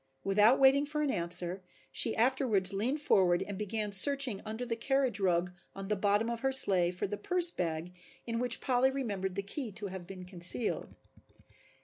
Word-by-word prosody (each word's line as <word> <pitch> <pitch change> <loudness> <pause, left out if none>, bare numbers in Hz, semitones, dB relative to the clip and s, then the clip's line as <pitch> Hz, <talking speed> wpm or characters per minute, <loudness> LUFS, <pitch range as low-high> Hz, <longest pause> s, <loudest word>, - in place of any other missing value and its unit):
Without 210 +5 +3
waiting 270 +1 +4
for 300 0 -2
an 285 - 0
answer 175 +1 +2 0.3
she 225 - +2
afterwards 225 -6 +2
leaned 240 +10 -2
forward 180 -10 +2
and 205 - -7
began 210 +1 -4
searching 250 +1 +4
under 220 +3 -5
the 235 -1 -3
carriage 260 -2 -1
rug 180 -2 0 0.2
on 195 0 -8
the 210 - +1
bottom 205 +2 0
of 235 0 -4
her 270 +1 -1
sleigh 190 -9 +2
for 180 0 -4
the 205 +1 -5
purse 360 - +1
bag 165 - -4 0.3
in 230 -1 -3
which 245 -1 0
Polly 255 0 +1
remembered 205 -9 -4
the 200 - -3
key 230 +4 -6
to 205 -1 -7
have 185 -2 -9
been 185 -1 -10
concealed. 180 +5 -3
210 Hz, 185 wpm, -30 LUFS, 190-260 Hz, 0.3 s, waiting